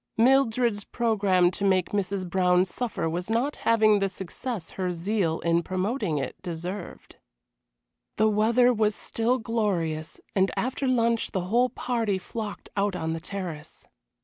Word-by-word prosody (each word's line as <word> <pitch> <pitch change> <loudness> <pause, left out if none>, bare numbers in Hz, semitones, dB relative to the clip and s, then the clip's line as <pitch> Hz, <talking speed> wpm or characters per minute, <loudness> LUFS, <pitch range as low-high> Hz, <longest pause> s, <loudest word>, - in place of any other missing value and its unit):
Mildred's 235 -3 +3
programme 200 -7 +2
to 200 - -4
make 190 -2 +2
Mrs. 195 -2 -1
Brown 180 0 +3
suffer 220 -2 -3
was 175 +4 -3
not 240 +6 0
having 215 -2 +5
the 195 0 +1
success 190 +2 -5
her 185 -1 -2
zeal 175 -1 -1
in 170 0 +2
promoting 185 - -1
it 140 +5 -4
deserved. 175 +2 -6 1.0
The 220 - +4
weather 230 +4 +4
was 215 -2 +1
still 235 +3 0
glorious, 195 -10 -2 0.2
and 190 0 +3
after 265 +2 -1
lunch 235 -2 +1
the 190 - 0
whole 235 +8 +2
party 230 -5 -1
flocked 210 +2 -6
out 200 -1 0
on 160 -2 -2
the 165 - -3
terrace. 170 -4 -7
200 Hz, 145 wpm, -26 LUFS, 180-230 Hz, 1.0 s, having